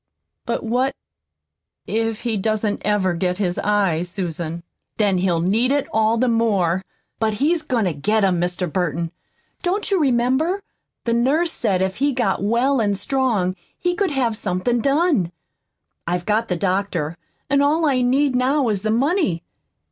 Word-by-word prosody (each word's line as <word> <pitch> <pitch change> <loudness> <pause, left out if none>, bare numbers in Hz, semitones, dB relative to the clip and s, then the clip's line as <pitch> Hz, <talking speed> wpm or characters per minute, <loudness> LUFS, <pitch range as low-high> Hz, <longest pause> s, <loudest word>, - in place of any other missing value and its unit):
"But 235 - -1
what 250 +4 0 0.9
if 225 0 -1
he 235 -2 -1
doesn't 215 0 -1
ever 200 -3 +1
get 180 +1 -1
his 180 -3 -1
eyes, 190 -5 +1
Susan?" 170 -2 -4 0.3
"Then 200 -4 +2
he'll 175 -3 +1
need 220 +9 +2
it 285 -1 +1
all 220 +1 +3
the 255 +2 +2
more. 200 -7 +2 0.4
But 220 -1 +1
he's 310 +8 +1
goin' 250 -8 0
to 180 - 0
get 210 +9 +1
'em, 180 -3 +2
Mr. 180 +1 -1
Burton. 170 -2 -1 0.5
Don't 385 +3 -1
you 390 - +3
remember? 275 +8 +1 0.4
The 235 - 0
nurse 285 +9 +2
said 195 - 0
if 190 0 -2
he 280 +2 +1
got 235 -8 0
well 240 +5 +2
an' 205 -2 +1
strong 205 -4 0 0.2
he 355 0 0
could 385 +1 0
have 255 -6 0
somethin' 215 +5 -1
done. 280 - +2 0.8
I've 175 0 -1
got 220 +2 +1
the 180 - -1
doctor, 180 -4 -1 0.3
an' 280 0 +3
all 310 +3 +2
I 265 -4 +2
need 260 +2 +2
now 260 +1 +2
is 205 -3 0
the 215 - -1
money. 240 - +1
220 Hz, 165 wpm, -21 LUFS, 185-265 Hz, 0.9 s, all